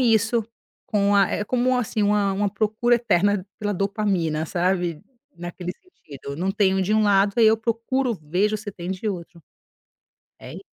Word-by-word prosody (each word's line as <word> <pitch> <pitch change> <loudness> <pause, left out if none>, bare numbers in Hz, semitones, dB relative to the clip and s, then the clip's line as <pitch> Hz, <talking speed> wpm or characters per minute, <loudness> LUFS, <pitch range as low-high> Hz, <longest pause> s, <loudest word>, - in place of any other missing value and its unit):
isso, 230 -1 +2 0.4
com 205 -1 +2
a 195 -2 +4
eh, 210 - -1
como 255 +2 +1
assim, 220 -2 -1
uma 205 -1 +2
uma 200 +1 0
procura 220 +4 +1
eterna 205 -3 +1
pela 205 -1 -1
dopamina, 190 -5 -1
sabe, 175 -1 -1 0.4
naquele 175 +1 -6
sentido. 140 - -11
Não 185 +4 -1
tenho 195 -1 +2
de 195 +3 0
um 215 - +4
lado, 200 0 +3
aí 225 - +6
eu 220 +1 +5
procuro, 235 +3 -1
vejo 185 +8 0
se 210 -1 -8
tem 175 0 -6
de 190 +3 -3
outro. 170 -3 -6 1.0
É - - -10
i - - -9
205 Hz, 165 wpm, -23 LUFS, 180-220 Hz, 1.0 s, aí